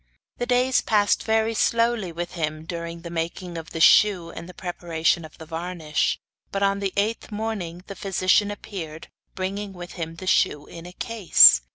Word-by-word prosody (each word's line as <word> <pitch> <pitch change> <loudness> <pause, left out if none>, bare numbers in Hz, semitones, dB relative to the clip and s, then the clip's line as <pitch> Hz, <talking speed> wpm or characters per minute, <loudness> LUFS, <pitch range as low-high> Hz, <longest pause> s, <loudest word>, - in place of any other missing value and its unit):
The 245 - -2
days 250 +1 +3
passed 205 -2 +2
very 220 0 +1
slowly 230 -4 +1
with 175 +1 -5
him 155 -2 -3
during 170 0 -6
the 170 - -8
making 170 +1 -4
of 165 -1 -7
the 165 - -5
shoe 180 0 +5
and 170 - -9
the - - -10
preparation 170 -2 -1
of 155 - -12
the 160 - -10
varnish, 165 -1 -1 0.3
but 200 0 -1
on 200 0 +2
the 195 -1 -1
eighth 215 +3 -1
morning 205 -5 -4
the 195 - -8
physician 195 +1 +2
appeared, 170 -6 -7 0.3
bringing 195 +2 -4
with 175 -1 -9
him 165 -2 -5
the 185 - -9
shoe 150 -5 +2
in 170 +1 -10
a - - -9
case. 175 - +6
180 Hz, 180 wpm, -24 LUFS, 165-205 Hz, 0.3 s, case